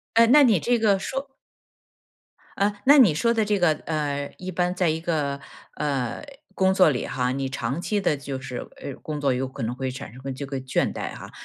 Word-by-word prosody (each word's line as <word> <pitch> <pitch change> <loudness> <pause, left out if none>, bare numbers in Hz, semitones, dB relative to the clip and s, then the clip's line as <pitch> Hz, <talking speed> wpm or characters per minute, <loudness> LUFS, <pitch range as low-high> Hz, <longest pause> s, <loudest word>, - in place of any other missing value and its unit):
呃， 230 0 +7
那 290 +4 +7
你 215 -9 +4
这 240 +5 +2
个 205 -4 +3
说 270 +7 -4 1.3
呃， 200 +1 +2
那 290 +2 +8
你 215 - +7
说 230 +10 +2
的 220 -2 +1
这 205 -1 +1
个， 175 -3 +4
呃， 145 -2 -2
一 185 0 -6
般 180 +1 0
在 180 -3 +2
一 160 +1 -1
个， 150 -4 -1 0.4
呃， 140 -5 -2 0.3
工 190 0 +2
作 185 -4 +5
里 125 - -2
哈， 125 -1 -1
你 135 0 -2
长 135 +3 -3
期 205 +1 -1
的 150 -6 +1
就 140 -1 -5
是， 125 -2 -6 0.2
呃， 140 - -5
工 150 -1 -5
作 135 -2 +2
有 130 +1 -2
可 135 -1 -7
能 115 +2 -2
会 130 0 -3
产 135 -2 -8
生 130 - -12
个 135 0 -5
这 140 +2 -6
个 135 -1 -4
倦 130 0 0
怠 - - -5
哈， - - -10
150 Hz, 235 characters per minute, -24 LUFS, 135-195 Hz, 1.3 s, 那